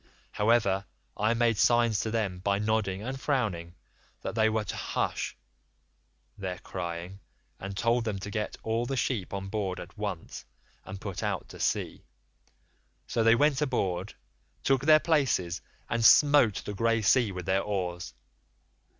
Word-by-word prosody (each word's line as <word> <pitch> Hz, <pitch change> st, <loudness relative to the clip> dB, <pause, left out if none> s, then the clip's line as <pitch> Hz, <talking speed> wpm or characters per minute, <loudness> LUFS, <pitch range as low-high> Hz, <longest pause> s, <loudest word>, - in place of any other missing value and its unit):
However, 105 Hz, -3 st, +2 dB, 0.3 s
I 110 Hz, +3 st, +1 dB
made 115 Hz, -2 st, +2 dB
signs 120 Hz, -3 st, +4 dB
to 110 Hz, -, -1 dB
them 105 Hz, -5 st, -1 dB
by 100 Hz, +2 st, +1 dB
nodding 105 Hz, -2 st, 0 dB
and 130 Hz, +3 st, -5 dB
frowning 95 Hz, -, -1 dB, 0.5 s
that -, -, -3 dB
they 110 Hz, 0 st, +3 dB
were 110 Hz, 0 st, 0 dB
to 90 Hz, -, -5 dB
hush -, -, -2 dB, 1.0 s
their 95 Hz, -2 st, -4 dB
crying, 90 Hz, +2 st, -6 dB, 0.4 s
and 95 Hz, 0 st, -6 dB
told 120 Hz, +2 st, +2 dB
them 110 Hz, -3 st, -2 dB
to 100 Hz, +2 st, -6 dB
get 105 Hz, -1 st, -3 dB
all 115 Hz, +2 st, -1 dB
the 135 Hz, -, -2 dB
sheep 115 Hz, -7 st, -1 dB
on 95 Hz, -1 st, -4 dB
board 95 Hz, -3 st, -2 dB
at -, -, -10 dB
once -, -, -5 dB, 0.4 s
and 95 Hz, 0 st, -7 dB
put 95 Hz, -2 st, -5 dB
out -, -, -2 dB
to -, -, -11 dB
sea; -, -, -1 dB, 1.0 s
so 115 Hz, -, -1 dB
they 115 Hz, +1 st, +6 dB
went 145 Hz, +1 st, +2 dB
aboard, 100 Hz, -9 st, -1 dB, 0.5 s
took 135 Hz, -2 st, +3 dB
their 155 Hz, 0 st, +8 dB
places, 130 Hz, -, +1 dB, 0.3 s
and 115 Hz, 0 st, -1 dB
smote 145 Hz, -4 st, +6 dB
the 105 Hz, -, -4 dB
grey 115 Hz, +2 st, +1 dB
sea 115 Hz, +1 st, +4 dB
with 90 Hz, -2 st, -6 dB
their 95 Hz, +2 st, +2 dB
oars. 90 Hz, -8 st, -3 dB
105 Hz, 155 wpm, -29 LUFS, 95-115 Hz, 1.0 s, their